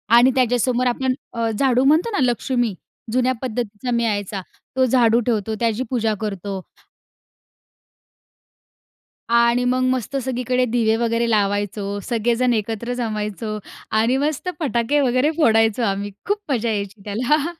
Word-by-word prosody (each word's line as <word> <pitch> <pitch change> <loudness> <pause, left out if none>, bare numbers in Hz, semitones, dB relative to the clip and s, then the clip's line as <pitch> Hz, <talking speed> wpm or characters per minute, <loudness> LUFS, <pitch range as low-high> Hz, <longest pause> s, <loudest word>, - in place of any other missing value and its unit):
आणि 245 +2 +6
त्याच्यासमोर 250 0 +2
आपण 255 +1 0 0.2
अ, 230 -1 -1
झाडू 260 -2 +3
म्हणतो 310 +10 +4
ना, 405 - -1
लक्ष्मी. 245 -2 0 0.4
जुन्या 255 +2 +2
पद्धतीचा 245 -1 -3
मिळायचा. 210 -4 -1 0.3
तो 260 0 +4
झाडू 235 -2 +4
ठेवतो 220 -2 0
त्याची 230 +1 0
पूजा 225 -4 0
करतो. 195 -2 -4 2.7
आणि 235 +1 +4
मग 255 +1 +1
मस्त 255 +1 -2
सगळीकडे 250 0 0
दिवे 225 -2 +2
वगैरे 230 0 0
लावायचो. 205 -1 0
सगळेजण 240 +1 +1
एकत्र 225 +2 -2
जमायचो 215 -2 -3 0.4
आणि 235 +4 +2
मस्त 300 +5 -1
फटाके 280 -2 +1
वगैरे 255 +3 +2
फोडायचो 225 -5 +3
आम्ही. 200 -1 -1
खूप 410 +1 0
मजा 235 -3 0
यायची 200 -1 -4
त्याला. 250 +9 +1
235 Hz, 125 wpm, -21 LUFS, 220-255 Hz, 2.7 s, आणि